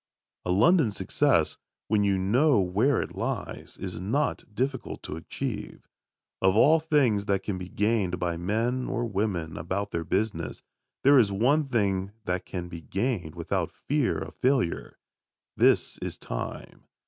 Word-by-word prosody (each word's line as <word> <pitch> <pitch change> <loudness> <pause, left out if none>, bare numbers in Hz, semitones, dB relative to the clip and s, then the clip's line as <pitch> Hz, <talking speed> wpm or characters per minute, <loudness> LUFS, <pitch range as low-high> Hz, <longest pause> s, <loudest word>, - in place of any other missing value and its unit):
A 90 - 0
London 155 - +5
success, 100 - +1 0.3
when 105 -1 +2
you 100 -1 +2
know 120 +8 +3
where 105 +9 +2
it - - -9
lies, - - -4
is 90 -2 -5
not 120 +11 0
difficult 130 +4 -3
to - - -5
achieve. 80 - -5 0.5
Of 95 0 +4
all 155 +8 +6
things 135 -10 +2
that 100 -1 +1
can 95 -3 -3
be 90 0 -7
gained 105 -4 +1
by 85 -1 -1
men 115 +8 -1
or 120 - -1
women 95 -7 -2
about 95 +5 -3
their 85 - -2
business, 85 -3 -2 0.4
there 140 0 +7
is 105 -5 +3
one 135 +10 +3
thing 100 -5 0
that 90 0 -2
can 90 -2 -4
be 85 -1 -8
gained 95 - -2
without - - -1
fear 145 -3 0
of - - -6
failure. 130 -9 0 0.6
This - - +3
is - - -5
time. - - -6
100 Hz, 150 wpm, -27 LUFS, 90-125 Hz, 0.6 s, there